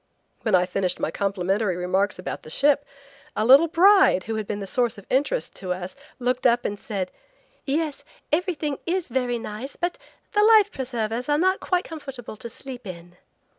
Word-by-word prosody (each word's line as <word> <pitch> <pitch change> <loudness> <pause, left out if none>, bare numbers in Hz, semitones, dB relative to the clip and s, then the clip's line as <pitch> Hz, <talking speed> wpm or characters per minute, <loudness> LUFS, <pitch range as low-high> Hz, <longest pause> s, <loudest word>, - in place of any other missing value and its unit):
When 215 -4 +2
I 180 0 +4
finished 185 0 -1
my - - -1
complimentary 195 0 0
remarks 190 +3 0
about 185 - -5
the - - -12
ship, 285 - +2 0.5
a 215 - +1
little 275 +7 +8
bride 360 - +5
who 225 - -4
had 215 -2 -3
been 205 -1 -3
a - - -4
source 240 +3 0
of 200 - -12
interest 290 - 0
to 185 -2 -2
us 180 +3 -7 0.2
looked 250 +1 +1
up 240 0 +2
and 205 0 -2
said: 190 -4 -4 0.5
"Yes, 295 +1 -1 0.3
everything 305 -4 0
is 360 -2 -1
very 245 -1 0
nice; 230 +4 -6
but 350 0 -2 0.3
the 415 - +3
life 435 -2 +6
preservers 245 -1 -3
are 295 - +3
not 375 +4 +2
quite 360 -1 0
comfortable 270 -8 -8
to 235 - -7
sleep 250 -1 -9
in." 175 -1 -9
245 Hz, 180 wpm, -24 LUFS, 200-295 Hz, 0.5 s, little